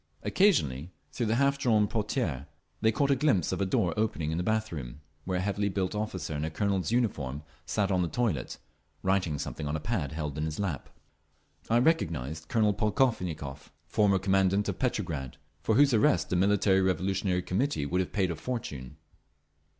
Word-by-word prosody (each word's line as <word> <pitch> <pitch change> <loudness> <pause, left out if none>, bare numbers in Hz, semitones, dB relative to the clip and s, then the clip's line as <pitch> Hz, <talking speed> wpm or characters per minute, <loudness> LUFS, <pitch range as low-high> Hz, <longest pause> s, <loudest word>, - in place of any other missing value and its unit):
Occasionally, 80 - +2 0.2
through 120 - -2
the 110 - +2
half 140 +2 +2
drawn 110 -6 +3
portières, 100 - -2 0.3
we 110 - +4
caught 140 +5 +1
a - - +5
glimpse 130 - +2
of - - -2
a 100 - +1
door 90 -2 +1
opening 95 -8 -1
into 80 +2 -1
a - - -2
bath 110 +2 0
room, 70 -5 -6 0.3
where 90 -1 -1
a - - -1
heavily 100 +1 0
built 95 -1 -1
officer 105 -7 -3
in 75 - -2
a 80 - -1
colonel's 100 +3 -1
uniform 75 - -1 0.2
sat 100 -2 0
on 90 -1 +2
the 85 - +1
toilet, 95 - -1 0.5
writing 95 -5 +1
something 75 +1 -5
on 75 - -2
a - - -1
pad 75 - -2
held 75 -2 -4
in 75 - 0
his 80 -1 -4
lap. 90 -10 -3 0.8
I 115 - +4
recognised 80 - 0
Colonel 105 0 +2
Polkovnikov, 95 - -1 0.2
former 100 +3 +3
commandant 95 +1 +2
of - - -4
Petrograd, 85 - -2 0.2
for 110 - +1
whose 140 +1 +5
arrest 105 -5 +3
the - - +2
Military 95 +1 +3
Revolutionary 95 0 0
Committee 95 - 0
would 90 +6 +1
have 90 - -4
paid 95 -4 +1
a - - -3
fortune. 75 - -5
95 Hz, 180 wpm, -29 LUFS, 80-110 Hz, 0.8 s, a